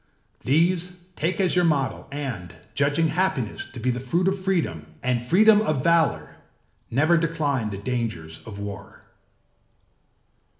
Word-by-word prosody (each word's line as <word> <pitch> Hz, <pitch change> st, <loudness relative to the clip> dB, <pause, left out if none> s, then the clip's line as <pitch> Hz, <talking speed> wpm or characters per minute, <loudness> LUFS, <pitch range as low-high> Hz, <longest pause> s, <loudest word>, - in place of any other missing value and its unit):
These 175 Hz, +5 st, +1 dB, 0.2 s
take 170 Hz, +6 st, -1 dB
as 185 Hz, -2 st, +2 dB
your 180 Hz, -, +4 dB
model 145 Hz, -5 st, 0 dB
and, 125 Hz, -, -5 dB, 0.2 s
judging 145 Hz, +6 st, +2 dB
happiness 155 Hz, -, -1 dB
to 125 Hz, -, -7 dB
be 125 Hz, +2 st, +1 dB
the 120 Hz, -, -3 dB
fruit 170 Hz, +9 st, 0 dB
of 190 Hz, 0 st, 0 dB
freedom 155 Hz, -, -1 dB, 0.2 s
and 125 Hz, -2 st, +1 dB
freedom 205 Hz, -, +5 dB
of 155 Hz, -11 st, 0 dB
valour, 160 Hz, -, +2 dB, 0.5 s
never 155 Hz, +8 st, +3 dB
decline 150 Hz, -8 st, 0 dB
the 100 Hz, -, -5 dB
dangers 100 Hz, -8 st, -4 dB
of 105 Hz, -2 st, -8 dB
war. 100 Hz, -1 st, -8 dB
145 Hz, 135 wpm, -24 LUFS, 115-170 Hz, 0.5 s, freedom